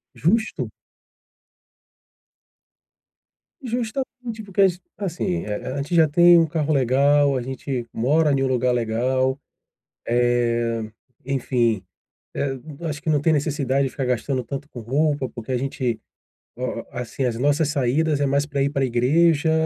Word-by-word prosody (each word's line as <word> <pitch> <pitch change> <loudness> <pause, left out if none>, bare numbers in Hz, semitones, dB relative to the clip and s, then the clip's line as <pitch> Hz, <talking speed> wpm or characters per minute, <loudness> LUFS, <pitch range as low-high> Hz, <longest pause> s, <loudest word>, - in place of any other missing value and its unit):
Justo. 220 +7 0 2.9
Justamente, 245 -1 -4
porque 200 0 -1
as 185 -2 +3 0.2
assim, 170 - -2
eh 105 0 -3
eh, - - -7
a - - -4
gente 145 +5 -2
já 160 -2 +6
tem 175 +3 +6
um 165 - +5
carro 155 -1 0
legal, 140 +2 +3
a - - -2
gente 130 0 -4
mora 145 +6 +2
ne 135 -1 +1
um - - +1
lugar 125 -1 +1
legal, 130 +3 0 1.9
eh, 140 - -2
enfim, 120 -6 +1 0.5
eh, 135 -1 -2 0.2
eu 170 - -6
acho 150 -1 -5
que 160 - -1
não 150 -2 +3
tem 160 +3 +2
necessidade 140 -3 +1
de 135 - -2
ficar 135 -1 -3
gastando 125 +2 -1
tanto 140 +3 -6
com 120 - -8
roupa, 140 +3 0
porque 120 +1 -7
a 125 - +1
gente, 125 -3 -2 0.6
ó 125 -2 -3
assim, 125 0 -4
as 115 -2 -1
nossas 145 +3 +2
saídas 145 +2 +1
é 145 - +2
mais 140 +1 +1
pra 140 -2 -2
ir 140 - +1
pra 140 -2 0
igreja, 145 +6 +3
140 Hz, 155 wpm, -23 LUFS, 125-155 Hz, 2.9 s, já